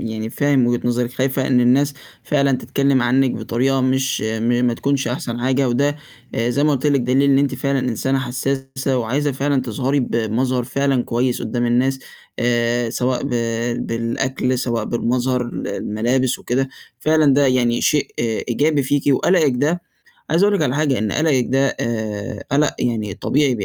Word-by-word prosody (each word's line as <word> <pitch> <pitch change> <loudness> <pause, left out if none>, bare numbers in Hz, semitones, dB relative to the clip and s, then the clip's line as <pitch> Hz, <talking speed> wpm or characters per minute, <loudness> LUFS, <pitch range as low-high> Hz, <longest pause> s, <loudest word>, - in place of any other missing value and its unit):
يعني 110 0 -4
فاهم 140 -2 +2
وجهة 120 0 +1
نظرِك، 120 0 -1
خايفة 135 0 0
إن 125 -2 +3
الناس 135 +4 +3 0.3
فعلًا 140 -2 +1
تتكلم 140 -2 +1
عنِّك 130 +2 +2
بطريقة 130 +3 0
مش 130 +1 0
م 110 +1 -1 0.2
ما 120 - +1
تكونش 140 0 -1
أحسن 120 -1 -4
حاجة، 130 +1 +1
وده 140 +4 +1 0.4
آآ 115 +1 0
زي 140 +4 +1
ما 150 - +3
قُلت 140 +1 -1
لِك، 140 -2 +3
دليل 130 +3 +2
إن 135 - +4
أنتِ 140 -1 +1
فعلًا 140 +1 -1
إنسانة 130 +2 -1
حسّاسة 135 +1 -2
وعايزة 135 +5 -1
فعلًا 135 0 0
تظهري 130 +4 -1
بمظهر 120 +2 -1
فعلًا 135 0 0
كويس 120 +1 -1
قدّام 120 +1 -1
الناس، 130 +3 +1 0.4
آآ 120 0 +1
سواء 125 +1 -1
ب 140 - -3 0.6
بالأكل، 125 +2 -1
سواء 120 -2 -1
بالمظهر، 125 +1 0
ال 120 - -5
الملابس 125 +4 -1
وكده، 130 +2 -1 0.3
فعلًا 155 0 +3
ده 140 0 +4
يعني 120 -2 +2
شيء 150 -2 +2
إيجابي 130 +6 0
فيكِ، 140 +1 0
وقلقِك 160 -1 +3
ده 165 +6 -1 0.4
عايز 165 +4 +3
أقول 205 0 +4
لِك - - +1
على 125 - 0
حاجة، 145 -4 +1
إن 105 -1 -1
قلَقِك 145 -6 +2
ده 135 +1 +1
آآ 110 -3 -4
قلَق 145 +1 +2
يعني 110 -5 -2
طبيعي، 140 +3 +1
بي 105 - -3
130 Hz, 170 wpm, -20 LUFS, 120-140 Hz, 0.6 s, إن